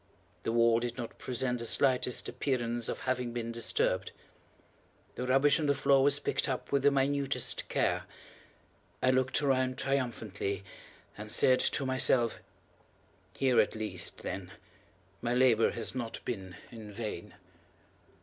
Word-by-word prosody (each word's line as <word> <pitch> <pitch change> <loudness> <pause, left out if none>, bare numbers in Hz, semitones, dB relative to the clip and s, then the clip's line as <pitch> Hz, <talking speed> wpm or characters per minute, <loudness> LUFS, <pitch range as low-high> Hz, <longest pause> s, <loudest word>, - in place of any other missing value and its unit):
The - - -2
wall 115 0 +4
did 120 +1 -4
not 120 -3 -7
present 125 0 -2
the 115 - -4
slightest 125 0 +3
appearance 120 -4 -2
of - - -4
having 125 -2 -2
been 115 -1 -3
disturbed. 115 0 0 1.0
The 125 - -4
rubbish 135 +5 +4
on 150 - 0
the 140 - +3
floor 135 0 +3
was 140 +1 +3
picked 145 - -1
up 130 - -4
with 140 -1 +2
the 145 - +5
minutest 140 0 0
care. - - 0 1.0
I 130 - +5
looked 130 +2 +1
around 130 -2 +1
triumphantly, 110 -7 -2 0.5
and 105 +1 -7
said 130 +2 +4
to 140 - 0
myself: 130 -3 +2 1.0
"Here 130 -2 +4
at - - -2
least, 105 -6 -2
then, 90 0 -5 0.7
my 120 +1 -1
labor 125 -3 +4
has 115 - -2
not 120 -3 -4
been 95 -6 -5 0.2
in 110 -3 -10
vain." 105 -2 -6
125 Hz, 140 wpm, -31 LUFS, 115-130 Hz, 1.0 s, the